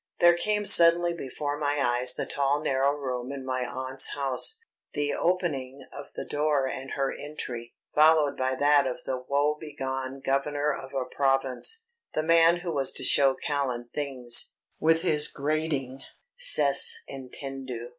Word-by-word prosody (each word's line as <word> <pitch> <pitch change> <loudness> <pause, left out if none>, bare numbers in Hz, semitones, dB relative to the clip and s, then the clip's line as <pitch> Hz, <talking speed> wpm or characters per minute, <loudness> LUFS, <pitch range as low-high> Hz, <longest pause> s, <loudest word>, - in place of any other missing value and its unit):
There 175 0 +6
came 210 +4 -1
suddenly 170 -1 +7
before 145 -1 -5
my 145 -1 -1
eyes 125 -1 +2
the - - -3
tall 140 +1 -1
narrow 135 +1 +1
room 130 -2 -5
in 135 -2 -7
my 130 -1 -2
aunt's 130 +1 0
house, 140 - +2 0.4
the 145 0 -1
opening 145 -7 -2
of 145 - -9
the - - -5
door 145 -2 0
and 130 +1 -6
her 135 -1 -1
entry, 125 -5 -8 0.2
followed 155 -1 +4
by 130 0 -1
that 145 0 +3
of 125 - -6
the 130 -1 -3
woebegone 140 -2 -3
governor 145 +2 0
of 135 0 -9
a 130 -1 -1
province 135 - -1 0.3
the 155 - 0
man 165 +1 +4
who 175 -1 -4
was 140 -4 +1
to - - +2
show 135 -1 +3
Callan 130 -5 -3
things 130 -5 +1 0.2
with 165 +1 +2
his 150 -4 +2
grating 140 -3 -3 0.4
"_Cest 145 - +3
entendu 130 -2 -8
140 Hz, 150 wpm, -26 LUFS, 130-150 Hz, 0.4 s, suddenly